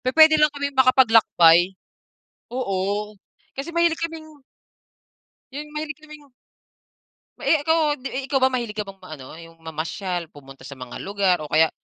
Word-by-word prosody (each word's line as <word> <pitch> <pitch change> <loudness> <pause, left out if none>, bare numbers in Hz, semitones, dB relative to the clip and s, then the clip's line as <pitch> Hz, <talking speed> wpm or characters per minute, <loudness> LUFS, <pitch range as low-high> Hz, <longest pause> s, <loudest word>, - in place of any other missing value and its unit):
pu - - -3
puwede 315 -1 +7
lang 300 - +6
kaming 285 0 -3
makapaglakbay. 220 -9 +5 0.8
Oo. 205 -2 -2 0.4
Kasi 280 +5 -5
mahilig 340 -1 +2
kaming 315 -2 -7 1.1
yung 300 +2 -8
mahilig 310 0 -5
kaming 300 -2 -15 1.1
Eh, 310 -3 +2
ikaw 320 +2 +2 0.2
'di 265 0 -6
ikaw 270 0 0
ba 260 - +5
mahilig 235 -4 -3
ka 215 - -2
bang 195 0 -11
ma 185 -4 -10
ano, 140 +2 -12
yung 165 0 -15
mamasyal, 165 +3 -4
pumunta 135 -2 -14
sa 140 - -9
mga 125 -2 -10
lugar 195 -2 +1
o 155 - -7
kaya 160 +2 +3
225 Hz, 150 wpm, -22 LUFS, -, 1.1 s, puwede